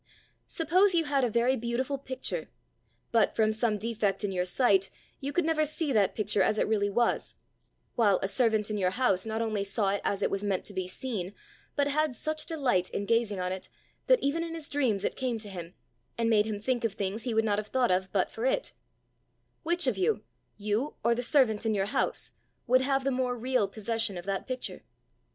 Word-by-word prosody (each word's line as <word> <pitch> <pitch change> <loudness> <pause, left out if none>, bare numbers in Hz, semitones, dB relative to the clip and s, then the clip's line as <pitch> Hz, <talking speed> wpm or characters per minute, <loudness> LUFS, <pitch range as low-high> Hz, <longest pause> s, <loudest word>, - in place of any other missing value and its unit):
Suppose 360 +4 +3
you 330 - +4
had 280 -2 +1
a 245 - +2
very 235 +4 +2
beautiful 255 +3 -2
picture, 260 -1 -5 0.6
but 230 -2 +3
from 220 -1 +3
some 220 -1 0
defect 215 -2 -1
in 205 - -1
your 180 -1 0
sight 195 -1 +3 0.3
you 280 +1 -3
could 345 +3 +1
never 320 -1 +2
see 305 -1 0
that 205 -4 +2
picture 210 -2 +1
as 215 +3 +2
it - - +1
really 205 -2 +1
was, 235 +4 0 0.6
while 205 -5 +4
a - - +1
servant 220 0 +2
in 210 - -1
your 185 -2 +2
house 195 -2 +1
not 220 +1 -1
only 215 -3 -1
saw 200 0 0
it 200 +1 -1
as 200 - -1
it - - +1
was 195 +1 -1
meant 195 -3 -1
to 205 - -9
be 185 -1 -2
seen, 200 -2 -4 0.4
but 285 -1 +2
had 300 -2 +1
such 310 +5 -3
delight 250 - +1
in 200 - -3
gazing 230 -3 +1
on 180 0 -1
it, 190 0 -6 0.4
that - - +6
even 310 +4 0
in 330 -1 -5
his 315 -3 -5
dreams 235 -9 +1
it - - -1
came 255 -3 -1
to 215 -2 -7
him, 175 -2 -8 0.4
and 230 0 +1
made 210 -1 +4
him 210 -2 -3
think 245 +2 -1
of 225 -3 0
things 200 +1 -3
he 235 -1 -2
would 225 0 +3
not 205 -1 +1
have 210 - -5
thought 250 -1 +1
of 185 +1 0
but 190 -3 +1
for 225 - -6
it: - - 0 0.9
which 345 0 +2
of 240 -7 0
you, 190 +3 +1 0.3
you 215 +7 -1
or 235 +1 +4
the 240 - -2
servant 240 -4 +3
in 220 -2 +1
your 195 -1 +1
house, 205 - -1 0.3
would 255 +2 +4
have 270 0 +1
the 275 - +1
more 250 -1 -1
real 250 -3 +1
possession 220 0 -2
of 175 - -7
that 195 -1 -2
picture? 255 -1 -5
225 Hz, 220 wpm, -29 LUFS, 200-260 Hz, 0.9 s, that